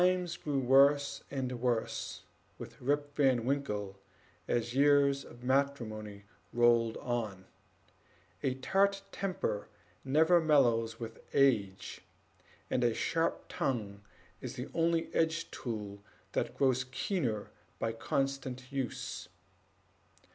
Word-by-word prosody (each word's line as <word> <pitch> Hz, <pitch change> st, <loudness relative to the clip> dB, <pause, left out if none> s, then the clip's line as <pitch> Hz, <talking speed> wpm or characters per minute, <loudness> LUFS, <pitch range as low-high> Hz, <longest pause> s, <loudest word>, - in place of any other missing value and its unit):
Times 180 Hz, -1 st, +2 dB
grew 145 Hz, -2 st, -2 dB
worse 140 Hz, +2 st, +4 dB
and 130 Hz, -3 st, -3 dB
worse 120 Hz, -3 st, -1 dB, 0.3 s
with -, -, -10 dB
Rip 145 Hz, +2 st, 0 dB
Van 130 Hz, -5 st, +3 dB
Winkle 105 Hz, -8 st, -2 dB, 0.5 s
as 120 Hz, 0 st, 0 dB
years 140 Hz, 0 st, +4 dB
of 120 Hz, +1 st, -14 dB
matrimony 115 Hz, -7 st, -1 dB, 0.3 s
rolled 120 Hz, -1 st, +3 dB
on; 110 Hz, -6 st, -3 dB, 1.0 s
a 130 Hz, -1 st, 0 dB
tart 195 Hz, +8 st, +2 dB
temper 180 Hz, -, -2 dB, 0.4 s
never 160 Hz, +6 st, +5 dB
mellows 120 Hz, -7 st, +3 dB
with 115 Hz, -1 st, -7 dB, 0.2 s
age, 105 Hz, -9 st, +2 dB, 0.7 s
and 125 Hz, -, 0 dB
a 120 Hz, -2 st, +2 dB
sharp 165 Hz, 0 st, 0 dB
tongue 105 Hz, -6 st, -2 dB, 0.4 s
is -, -, -6 dB
the 125 Hz, +3 st, -5 dB
only 165 Hz, 0 st, +1 dB
edged 165 Hz, 0 st, 0 dB
tool 105 Hz, -4 st, -5 dB, 0.3 s
that -, -, -2 dB
grows 130 Hz, -2 st, +3 dB
keener 130 Hz, -, -2 dB, 0.3 s
with 115 Hz, 0 st, -2 dB
constant 135 Hz, -1 st, -2 dB
use. 135 Hz, -3 st, -4 dB
130 Hz, 110 wpm, -32 LUFS, 115-145 Hz, 1.0 s, never